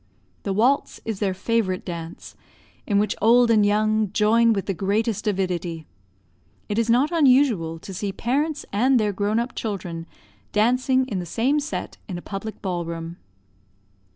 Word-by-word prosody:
The 200 Hz, -, -3 dB
waltz 245 Hz, +8 st, +1 dB
is 220 Hz, -4 st, -3 dB
their 195 Hz, -3 st, 0 dB
favorite 195 Hz, -2 st, -1 dB
dance, 170 Hz, -2 st, -7 dB, 0.5 s
in 205 Hz, -, +2 dB
which 205 Hz, 0 st, +1 dB
old 235 Hz, +2 st, +5 dB
and 215 Hz, -2 st, +5 dB
young 215 Hz, 0 st, +2 dB
join 230 Hz, +2 st, +4 dB
with 200 Hz, -3 st, -1 dB
the 195 Hz, -, -1 dB
greatest 210 Hz, +4 st, -1 dB
avidity; 180 Hz, -5 st, -2 dB, 0.8 s
it 210 Hz, +2 st, -1 dB
is 230 Hz, 0 st, 0 dB
not 255 Hz, +7 st, +3 dB
unusual 255 Hz, -, +3 dB
to 190 Hz, +4 st, -9 dB
see 195 Hz, +2 st, -3 dB
parents 290 Hz, +9 st, -1 dB
and 250 Hz, +5 st, +3 dB
their 210 Hz, -2 st, 0 dB
grown 205 Hz, +3 st, 0 dB
up 240 Hz, +2 st, -1 dB
children 175 Hz, -6 st, -5 dB, 0.5 s
dancing 255 Hz, +4 st, +2 dB
in 205 Hz, -7 st, -3 dB
the 175 Hz, -, -4 dB
same 260 Hz, -, +1 dB
set 295 Hz, +1 st, -5 dB
in 180 Hz, -, -4 dB
a -, -, -7 dB
public 205 Hz, +2 st, -7 dB
ball 180 Hz, -3 st, -2 dB
room. 165 Hz, 0 st, -6 dB
210 Hz, 160 wpm, -23 LUFS, 185-235 Hz, 0.8 s, old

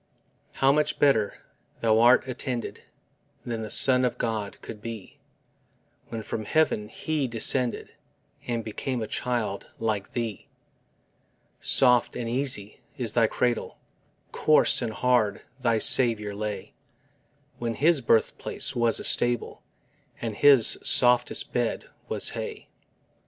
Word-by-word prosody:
How 135 Hz, 0 st, +3 dB
much 150 Hz, +1 st, 0 dB
better 115 Hz, -8 st, +2 dB, 0.5 s
thou'rt 115 Hz, +3 st, +4 dB
attended 125 Hz, -1 st, -5 dB, 0.6 s
Than 115 Hz, -2 st, -4 dB
the 110 Hz, -, -6 dB
Son 130 Hz, +2 st, +4 dB
of 125 Hz, -, -1 dB
God 110 Hz, -3 st, -3 dB
could 105 Hz, -, -9 dB
be, 115 Hz, -3 st, -9 dB, 0.9 s
When 115 Hz, -2 st, -6 dB
from 110 Hz, +1 st, -5 dB
heaven 105 Hz, -7 st, 0 dB
He 155 Hz, -4 st, -2 dB
descended 120 Hz, +1 st, +1 dB, 0.5 s
And 115 Hz, -1 st, -2 dB
became 120 Hz, +3 st, -4 dB
a -, -, -5 dB
child 115 Hz, -6 st, -3 dB
like 110 Hz, -3 st, -3 dB
thee! 115 Hz, -4 st, -4 dB, 1.1 s
Soft 125 Hz, -2 st, +3 dB
and 120 Hz, -, -4 dB
easy 120 Hz, -4 st, -2 dB, 0.2 s
is 120 Hz, -5 st, -2 dB
thy 115 Hz, -2 st, +3 dB
cradle: 120 Hz, +1 st, -2 dB, 0.5 s
Coarse 155 Hz, -3 st, +3 dB
and 120 Hz, -2 st, -2 dB
hard 115 Hz, -3 st, 0 dB, 0.2 s
thy 115 Hz, -3 st, +1 dB
Saviour 110 Hz, -3 st, +3 dB
lay, 105 Hz, 0 st, -5 dB, 0.9 s
When 115 Hz, -1 st, -3 dB
His 155 Hz, +1 st, +3 dB
birthplace 115 Hz, -2 st, -1 dB
was 120 Hz, -2 st, +1 dB
a -, -, -7 dB
stable 120 Hz, -1 st, +1 dB, 0.6 s
And 115 Hz, -3 st, -4 dB
His 140 Hz, -4 st, +5 dB
softest 125 Hz, -1 st, +2 dB
bed 120 Hz, -2 st, -1 dB, 0.2 s
was -, -, 0 dB
hay. -, -, -7 dB
120 Hz, 120 wpm, -26 LUFS, 110-125 Hz, 1.1 s, His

